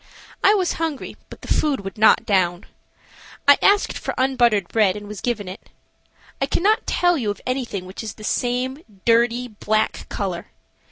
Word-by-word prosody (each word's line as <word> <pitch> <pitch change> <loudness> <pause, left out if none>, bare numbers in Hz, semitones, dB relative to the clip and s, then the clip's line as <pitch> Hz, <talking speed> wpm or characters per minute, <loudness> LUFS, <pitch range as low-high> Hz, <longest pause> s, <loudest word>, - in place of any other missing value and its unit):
I 410 +2 +6
was 370 -3 +1
hungry, 315 -5 -3
but - - -12
the - - -10
food 290 -7 +1
would 195 0 -7
not 220 +1 +4
down. 180 -3 +1 0.8
I 285 - +7
asked 405 0 +3
for - - -4
unbuttered 240 -7 +2
bread 210 -4 +2
and 205 0 -8
was 205 -3 -8
given 225 -5 -2
it. 185 +2 -10 0.7
I - - +2
cannot 420 +5 +1
tell 350 -3 +2
you 220 -5 -1
of 205 - -3
anything 250 -7 -3
which 185 +1 -8
is 220 -2 -6
the 215 - -12
same 250 +5 -1 0.2
dirty, 235 +1 +3
black 215 -1 -1
color. 185 -4 -4
230 Hz, 170 wpm, -22 LUFS, 205-265 Hz, 0.8 s, I